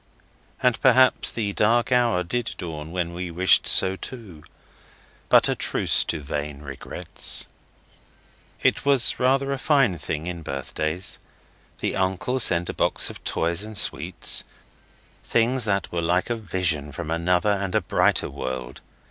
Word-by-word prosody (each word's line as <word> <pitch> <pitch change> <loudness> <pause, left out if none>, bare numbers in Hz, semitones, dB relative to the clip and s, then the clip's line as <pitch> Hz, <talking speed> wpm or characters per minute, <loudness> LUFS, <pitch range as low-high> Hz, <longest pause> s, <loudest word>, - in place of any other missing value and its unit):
And 125 -2 +2
perhaps 130 0 +4
the 105 -3 -3
dark 115 +4 +2
hour 120 -7 +2
did 115 +6 -3
dawn 80 -4 -6
when 85 -1 -3
we 90 0 -5
wished 90 +3 +3
so 95 0 +4
too. 95 - -9 0.9
But - - +6
a - - +1
truce - - +2
to 80 - -3
vain 75 0 -5
regrets. 70 -2 -3 1.2
It - - +2
was 140 -4 +3
rather 135 +2 +2
a 135 - -2
fine 135 - +2
thing 75 +2 -4
in 90 -1 -5
birthdays. 80 +5 -4 0.6
The - - -1
uncle 95 +7 -1
sent 90 -7 +3
a - - -4
box - - 0
of - - -13
toys 85 +2 -1
and 110 0 -6
sweets, - - +1 0.8
things 120 +1 +1
that 100 -3 -1
were 85 - -2
like 90 +7 0
a - - +1
vision 90 -8 -2
from 80 +2 -6
another 90 +4 +1
and 100 -1 -2
a 110 - +3
brighter - - +1
world. 65 -1 -6
90 Hz, 150 wpm, -24 LUFS, 80-115 Hz, 1.2 s, But